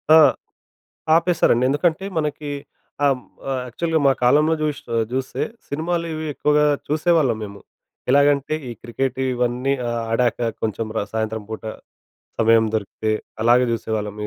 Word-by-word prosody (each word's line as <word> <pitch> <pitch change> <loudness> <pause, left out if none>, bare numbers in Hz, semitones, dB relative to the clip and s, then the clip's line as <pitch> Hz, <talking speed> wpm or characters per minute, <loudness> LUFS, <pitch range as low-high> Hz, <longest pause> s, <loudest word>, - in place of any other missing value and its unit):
ఆ! - - +10 1.0
ఆపేశారండి. 165 -8 +3
ఎందుకంటే 165 +5 +1
మనకి 150 -1 -3 0.5
హ్మ్, 135 -3 +3 0.3
ఆహ్, 130 -1 -1
యాక్చువల్‌గా 160 +5 -1
మా 135 - +6
కాలంలో 150 +6 +4
జూష్ 150 -2 -1
ఆహ్, 115 - +2
జూస్తే 130 0 -2 0.2
సినిమాలు 170 +3 -2
ఇవి 155 0 -4
ఎక్కువగా 150 0 +3 0.2
చూసేవాళ్ళం 155 -6 +2
మేము. 100 0 -10 0.5
ఎలాగంటే 140 +1 +3
ఈ - - -5
క్రికెట్ 130 +2 -2
ఇవన్నీ 125 +2 0 0.2
ఆ - - -1 0.2
ఆడాక 120 0 +1
కొంచెం 110 0 -2
ర - - +2
సాయంత్రం 110 -1 -2
పూట 110 0 -6 0.8
సమయం 115 0 +5
దొరికితే 110 +1 -2 0.3
అలాగే 120 +2 +5
చూసేవాళ్ళం 105 -2 -3
130 Hz, 130 wpm, -22 LUFS, 115-150 Hz, 1.0 s, ఆ